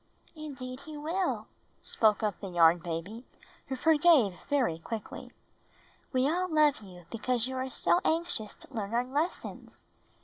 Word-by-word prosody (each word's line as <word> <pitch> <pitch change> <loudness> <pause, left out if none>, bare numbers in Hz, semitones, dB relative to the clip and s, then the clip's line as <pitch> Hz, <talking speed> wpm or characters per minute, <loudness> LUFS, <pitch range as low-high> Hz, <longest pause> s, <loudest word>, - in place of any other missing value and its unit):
"Indeed 265 -5 -7
he 305 +1 -9
will," 335 +6 -1 0.4
spoke 215 -1 +2
up 210 -3 -1
the 200 - -6
Yarn 170 -1 +5
Baby, 175 +8 -5 0.4
who 265 - -3
forgave 305 - +5 0.2
very 250 - +1
quickly. 220 +5 -7 0.8
"We 260 -1 +2
all 360 +4 0
love 305 -4 +4
you 180 -4 -13
because 235 +1 +1
you 260 - -5
are 260 +1 -2
so 345 - +2
anxious 320 -10 -1
to - - -15
learn 220 -1 -3
our 245 +1 +2
lessons. 295 +7 -4
255 Hz, 145 wpm, -30 LUFS, 210-305 Hz, 0.8 s, Yarn